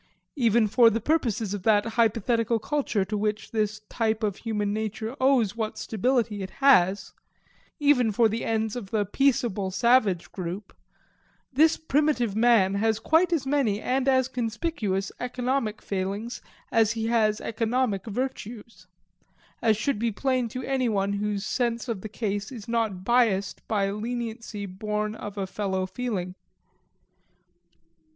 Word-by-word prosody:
Even 235 -4 +3
for 230 +2 +6
the 225 +1 -1
purposes 230 -7 0
of 205 - -4
that 205 +1 +3
hypothetical 230 0 +2
culture 240 -5 -1
to 210 +3 -4
which 210 +1 -2
his 215 -1 -1
type 220 0 -2
of 205 -3 -1
human 210 -3 -2
nature 220 +2 -3
owes 255 -6 +3
what 220 -2 -3
stability 225 -1 0
it 190 - -5
has 200 -9 +4 0.7
even 280 -6 +4
for 225 +2 +4
the 220 +2 -3
ends 220 -1 -1
of 225 -6 -6
the 210 -1 0
peaceable 230 -4 +1
savage 200 -3 +2
group 185 +2 -6 0.8
this 315 +4 +4
primitive 290 -8 +1
man 220 -4 +4
has 220 +2 +1
quite 320 +9 +2
as 315 -6 0
many 265 -7 +1
and 260 +3 -1
as 260 -1 +3
conspicuous 230 - -2
economic 250 -2 -2
failings 200 +4 -3 0.3
as 225 -1 +3
he 225 -1 -3
has 220 -2 +2
economic 225 -2 -1
virtues 235 -1 -5 0.7
as 220 -3 +3
should 215 +1 -1
be 230 0 0
plain 255 +2 0
to 255 +3 -6
any 260 -2 0
one 200 -1 0
whose 205 0 -2
sense 235 0 -1
of 225 -5 -3
the 215 - -6
case 205 0 -3
is 230 -6 -9
not 225 -6 -1
biased 225 -5 +2
by 200 -2 0
leniency 225 -1 -4
born 210 +2 -3
of 205 -1 -8
a 195 - -1
fellow 190 -1 -2
feeling. 185 -3 -3
220 Hz, 145 wpm, -26 LUFS, 205-245 Hz, 0.8 s, for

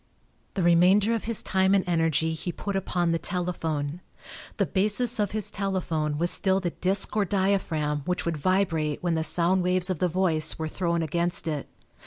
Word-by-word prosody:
The 190 - -1
remainder 185 +6 +4
of 225 - -3
his 230 -1 -2
time 190 +1 +2
and 195 - +2
energy 165 -2 +1
he 160 +3 -4
put 200 +3 -5
upon 175 -2 -1
the 165 0 0
telephone. 165 -4 -3 0.6
The - - +2
basis 215 +5 +2
of 205 -2 +1
his 215 -1 -2
telephone 170 -6 -2
was 170 +2 +3
still 190 -1 +1
the 175 -3 -3
disk 190 +5 +2
or 210 - +2
diaphragm 185 -6 0
which 180 0 -2
would 170 -2 -2
vibrate 165 -3 0
when 175 -2 0
the 160 -1 0
sound 175 +3 +2
waves 180 +1 +2
of 175 - -3
the 180 - +2
voice 165 -3 0
were 160 - -3
thrown 170 0 -1
against 170 +2 -2
it. 150 -3 -3
180 Hz, 185 wpm, -26 LUFS, 160-190 Hz, 0.6 s, remainder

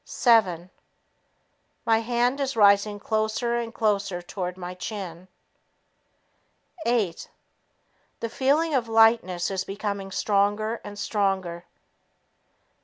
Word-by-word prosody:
Seven... 185 -7 +2 1.1
My 225 -1 +4
hand 240 +3 0
is 275 -2 -1
rising 205 -1 +4
closer 220 +3 -1
and 235 -1 -3
closer 205 -5 0
toward 180 0 -5
my 180 0 -6
chin. 185 -2 -7 1.6
Eight... 215 -8 0 0.9
The 230 - -2
feeling 285 +7 +1
of 250 -4 +1
lightness 225 -6 +3
is 190 -1 -1
becoming 200 0 -4
stronger 205 +3 0
and 205 0 -9
stronger. 190 -5 -1
205 Hz, 100 wpm, -25 LUFS, 190-230 Hz, 1.6 s, My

